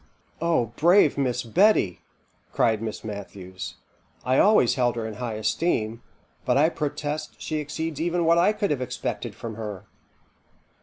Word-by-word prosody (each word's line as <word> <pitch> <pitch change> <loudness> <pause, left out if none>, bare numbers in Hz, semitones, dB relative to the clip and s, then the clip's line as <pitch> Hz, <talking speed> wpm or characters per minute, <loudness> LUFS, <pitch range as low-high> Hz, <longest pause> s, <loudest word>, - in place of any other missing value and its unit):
'" - - -35
"O 115 -5 0
brave 175 -1 +5
Miss 130 -3 0
Betty!" 135 - +3 0.5
cried 110 -2 +2
Miss 110 -1 -5
Matthews; 95 -3 -7 0.5
"I 130 +2 +3
always 205 - +5
held 125 -2 +1
her 115 -2 -3
in 110 - -5
high 115 0 -4
esteem; 110 -1 -1 0.4
but 125 +1 +2
I 155 +3 +5
protest 150 -1 -4
she 155 - -3
exceeds 155 +1 -4
even 170 0 0
what 170 +1 +5
I 180 +4 +4
could 210 -3 -1
have 140 -3 -1
expected 125 0 -4
from 115 -2 -7
her." 105 -4 -6
130 Hz, 155 wpm, -25 LUFS, 110-160 Hz, 0.5 s, brave